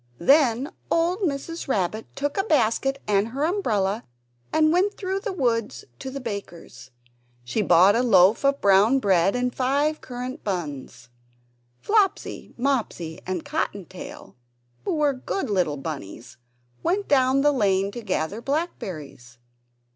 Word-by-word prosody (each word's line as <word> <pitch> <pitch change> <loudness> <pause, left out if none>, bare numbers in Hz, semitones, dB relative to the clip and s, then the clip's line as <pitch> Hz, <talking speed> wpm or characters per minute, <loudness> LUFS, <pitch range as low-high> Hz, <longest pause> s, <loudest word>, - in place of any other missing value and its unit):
Then 270 - +3 0.2
old 340 +3 +1
Mrs. 330 -2 -3
Rabbit 215 -2 -1
took 285 +1 -2
a 390 - +2
basket 270 - +1
and 205 0 +2
her 265 +5 -3
umbrella 225 - 0 0.5
and 310 0 +3
went 385 +4 +1
through 380 0 -2
the 420 +1 -4
wood 235 - 0 0.2
to 265 - -5
the 275 +1 -6
baker's. 175 - -8 0.5
She 125 - -1
bought 185 +2 +5
a 235 - +3
loaf 200 -2 +5
of 275 0 +2
brown 200 +6 +5
bread 195 -5 +2
and 250 0 -1
five 285 +4 0
currant 250 +1 -6
buns. 145 - -5 0.7
Flopsy, 410 -3 0
Mopsy, 235 -11 -2
and 185 -3 -3
Cotton 200 -3 -2
tail, 185 +1 -11 0.5
who - - 0
were 295 -2 +2
good 260 - -3
little 175 -7 +1
bunnies, 120 -5 -7 0.4
went 395 +3 0
down 265 -1 +3
the 295 +1 +4
lane 200 -6 +1
to 240 - -7
gather 200 0 -2
blackberries. 170 - -5
235 Hz, 140 wpm, -24 LUFS, 190-285 Hz, 0.7 s, bought